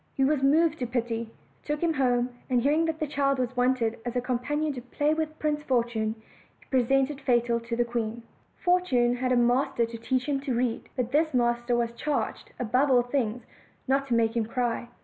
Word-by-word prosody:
He 270 - +2
was 290 0 +2
moved 315 +3 +3
to 250 - -2
pity, 230 -2 -2 0.3
took 295 0 -2
him 335 -1 +2
home, 245 -3 +1 0.2
and 250 -1 +3
hearing 295 +6 +2
that 320 -1 -2
a - - +2
child 280 -1 0
was 255 -1 -2
wanted 245 -2 +1
as 240 0 -4
a - - +2
companion 275 +5 -1
to 250 - -6
play 290 +5 0
with 315 0 -3
Prince 300 -1 -1
Fortune, 235 -5 0 0.4
he - - -22
presented 270 +2 +2
Fatal 240 -2 +2
to 230 0 -4
the 240 0 +1
queen. 235 -1 -3 0.3
Fortune 265 -10 +2
had 255 0 -1
a - - +4
master 240 0 +2
to 230 0 -8
teach 255 +2 -1
him 285 -2 0
to 270 -3 -2
read; 240 -1 -1
but 250 -2 -2
this 310 0 +2
master 240 0 +1
was 235 -1 0
charged, 295 +4 -3
above 250 +4 +2
all 250 -2 +5
things, 245 -2 -2 0.4
not 275 +1 +1
to 240 - +1
make 225 0 +2
him 225 -2 0
cry. 240 0 -2
250 Hz, 205 wpm, -27 LUFS, 235-280 Hz, 0.4 s, all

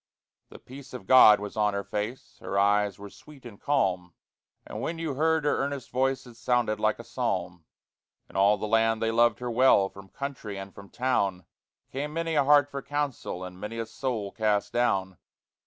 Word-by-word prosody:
The - - -12
peace 130 0 -12
of 110 - -8
God 110 -3 +8
was 105 0 -7
on 105 -1 +1
her 100 - -2
face, 105 +5 -5
Her 100 - -3
eyes 100 -1 +2
were 100 0 -10
sweet 145 -4 -16
and 110 -4 -11
calm, 95 - 0 0.5
And - - -7
when 165 - -3
you 165 -3 -3
heard 160 +2 +1
her 145 - +1
earnest 140 -2 -4
voice 130 +2 0
It 120 - -13
sounded 120 -4 0
like 110 0 +1
a 115 - -9
psalm. 90 -10 -3 0.6
In - - -20
all 100 +2 +4
the 105 - -4
land 115 0 +2
they 115 0 0
loved 120 0 +3
her 125 -1 -3
well; 115 -5 +4
From 95 0 -14
country 130 -7 -6
and 95 0 -8
from 100 -1 -13
town 100 -8 -1 0.5
Came 145 +3 -4
many 165 0 -2
a 150 - +3
heart 145 0 +5
for 140 - -5
counsel, 145 -11 -3
And 90 0 -9
many 105 +3 -6
a 115 - -2
soul 115 -3 -4
cast 105 -2 0
down. 95 - 0
115 Hz, 195 wpm, -27 LUFS, 100-135 Hz, 0.6 s, God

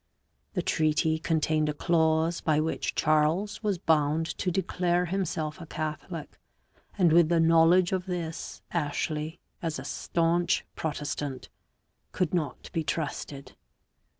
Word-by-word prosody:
The - - 0
treaty 160 0 +2
contained 155 -1 +1
a 150 - -2
clause 160 +1 +2
by 155 -2 +2
which 160 +1 -1
Charles 155 +8 +2
was 205 -4 0
bound 160 -1 +2
to 185 - 0
declare 180 -1 +1
himself 170 -3 -2
a 165 - -8
Catholic, 155 +1 -5 0.6
and 175 -5 +4
with 170 -1 +6
the 170 -1 +3
knowledge 165 +2 +5
of 185 0 -1
this 170 -2 -5
Ashley, 155 0 -2 0.2
as 165 -2 -2
a 130 - -6
stanch 170 +3 +1
Protestant, 145 -3 -4 0.6
could 180 -3 0
not 165 -5 -2
be 165 - 0
trusted. 145 -3 -4
160 Hz, 125 wpm, -28 LUFS, 155-175 Hz, 0.6 s, with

